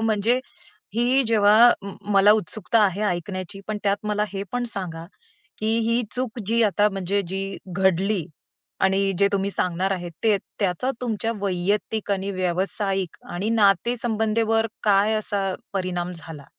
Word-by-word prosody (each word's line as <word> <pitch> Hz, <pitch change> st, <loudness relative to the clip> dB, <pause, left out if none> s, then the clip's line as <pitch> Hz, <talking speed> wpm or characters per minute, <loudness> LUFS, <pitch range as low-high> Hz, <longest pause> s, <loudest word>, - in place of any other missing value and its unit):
म्हणजे 225 Hz, +2 st, +2 dB, 0.6 s
ही 245 Hz, +4 st, +3 dB
जेव्हा 215 Hz, 0 st, +6 dB
अ, 200 Hz, -, 0 dB
म 200 Hz, -, -7 dB, 0.2 s
मला 200 Hz, +1 st, +6 dB
उत्सुकता 215 Hz, +1 st, +1 dB
आहे 195 Hz, +1 st, 0 dB
ऐकण्याची 185 Hz, +2 st, -4 dB
पण 215 Hz, -1 st, -3 dB
त्यात 200 Hz, -1 st, +2 dB
मला 210 Hz, 0 st, +1 dB
हे 195 Hz, 0 st, -3 dB
पण 245 Hz, 0 st, -1 dB
सांगा 165 Hz, -4 st, -5 dB, 0.5 s
की 220 Hz, +1 st, +1 dB
ही 235 Hz, +1 st, +2 dB
चूक 250 Hz, -1 st, -3 dB
जी 230 Hz, +1 st, +3 dB
आता 205 Hz, 0 st, +3 dB
म्हणजे 195 Hz, 0 st, -1 dB
जी 195 Hz, +1 st, -4 dB, 0.2 s
घडली 190 Hz, -1 st, +2 dB, 0.6 s
आणि 195 Hz, +1 st, +2 dB
जे 200 Hz, 0 st, +4 dB
तुम्ही 200 Hz, 0 st, 0 dB
सांगणार 185 Hz, 0 st, -1 dB
आहेत 175 Hz, -2 st, -4 dB
ते 215 Hz, -2 st, +4 dB, 0.2 s
त्याचा 200 Hz, +6 st, 0 dB
तुमच्या 230 Hz, -2 st, -1 dB
वैयक्तिक 200 Hz, +3 st, -1 dB
आणि 195 Hz, +1 st, -2 dB
व्यावसायिक 185 Hz, 0 st, -1 dB
आणि 190 Hz, +5 st, -2 dB
नाते 220 Hz, +1 st, +3 dB
संबंधीवर 225 Hz, 0 st, +1 dB, 0.2 s
काय 205 Hz, +1 st, +3 dB
असा 205 Hz, -2 st, -1 dB, 0.3 s
परिणाम 180 Hz, -2 st, -2 dB
झाला. 160 Hz, -3 st, -8 dB
200 Hz, 150 wpm, -23 LUFS, 190-220 Hz, 0.6 s, जेव्हा